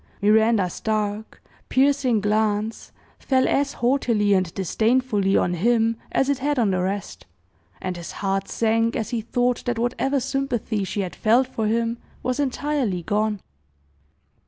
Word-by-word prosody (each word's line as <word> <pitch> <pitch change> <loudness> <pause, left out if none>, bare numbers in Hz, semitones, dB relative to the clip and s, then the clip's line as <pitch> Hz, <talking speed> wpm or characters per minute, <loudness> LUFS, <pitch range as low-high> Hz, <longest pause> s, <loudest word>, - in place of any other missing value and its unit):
Miranda's 215 -3 +3
dark, 215 0 -3 0.3
piercing 265 -4 +2
glance 215 +1 -1 0.3
fell 260 -1 +2
as 280 0 +1
haughtily 235 -5 +1
and 185 -3 +1
disdainfully 210 +1 +1
on 175 - +1
him 225 +5 +2 0.2
as 270 - +1
it 280 -2 0
had 290 +2 0
on 220 -5 +2
the 185 -1 0
rest; 195 - -4 0.5
and 185 -1 -4
his 170 - -7
heart 195 -1 -2
sank 225 0 +1
as 225 - -3
he 235 -2 -1
thought 245 +2 0
that 240 -1 -1
whatever 250 +4 0
sympathy 250 -5 -2
she 200 +2 -2
had 180 -5 -5
felt 235 +4 +3
for 225 -4 -3
him 230 +1 0 0.2
was 255 +2 -1
entirely 270 - -1
gone. 210 +1 0
225 Hz, 145 wpm, -23 LUFS, 205-250 Hz, 0.5 s, Miranda's